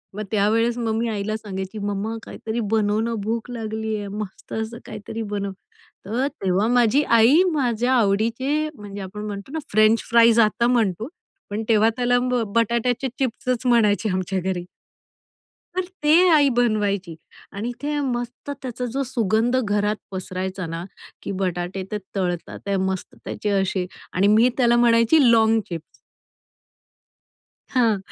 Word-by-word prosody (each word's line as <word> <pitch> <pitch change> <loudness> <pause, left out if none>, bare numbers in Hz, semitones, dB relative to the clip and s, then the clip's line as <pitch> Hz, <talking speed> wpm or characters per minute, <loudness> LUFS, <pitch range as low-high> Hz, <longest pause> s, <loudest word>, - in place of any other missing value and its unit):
मग 215 - -3
त्यावेळेस 225 +3 +2
मग 225 -2 -1
मी 230 +1 0
आईला 215 0 -2
सांगायची, 190 -1 -6
"मम्मा, 205 +2 -2
काहीतरी 225 +1 -5
बनवणं. 220 +2 +1
भूक 230 +2 -3
लागली 220 -1 -3
आहे. 205 -1 -5
मस्त 210 -3 -7
असं 220 +1 -3
काहीतरी 215 +1 -7
बनव." 200 -1 -2 0.5
तर 240 +7 0 0.2
तेव्हा 190 +3 +2
माझी 245 +3 +3
आई 270 +11 +6
माझ्या 245 -2 +1
आवडीचे 235 +8 +1
म्हणजे 205 -2 -8
आपण 210 +3 -7
म्हणतो 205 +4 -6
ना, 320 - -3
फ्रेंच 215 +2 +4
फ्राईज 235 0 +6
आता 230 +2 +3
म्हणतो 225 -3 +1 0.4
पण 210 +2 -3
तेव्हा 220 0 +5
त्याला 245 0 +2 0.4
बटाट्याचे 235 +3 +1
चिप्सच 255 0 -1
म्हणायचे 220 -3 +3
आमच्या 185 +1 -1
घरी. 180 -1 -2 1.1
तर 370 0 0 0.2
ते 300 - +4 0.2
आई 290 -3 +5
बनवायची 205 -7 +1 0.4
आणि 220 +5 -4
ते 295 0 -1
मस्त 245 0 -4
त्याचा 250 -1 -4
जो 275 - 0
सुगंध 235 -1 +1
घरात 205 0 +1 0.2
पसरायचा 185 0 -4
ना, 165 +1 -5 0.4
की - - -5
बटाटे 185 0 -2
ते 210 - -1 0.2
तळतात 175 -3 -2
ते 200 - 0
मस्त 190 -1 -4
त्याचे 210 - -3
असे 190 -1 -1 0.3
आणि 190 +2 +3
मी 220 +4 +5
त्याला 240 -2 +4
म्हणायची 235 +4 +4
लॉन्ग 225 -1 +4
चिप्स. 170 -3 -4 1.9
हां, 230 -4 +3
220 Hz, 140 wpm, -23 LUFS, 200-240 Hz, 1.9 s, आई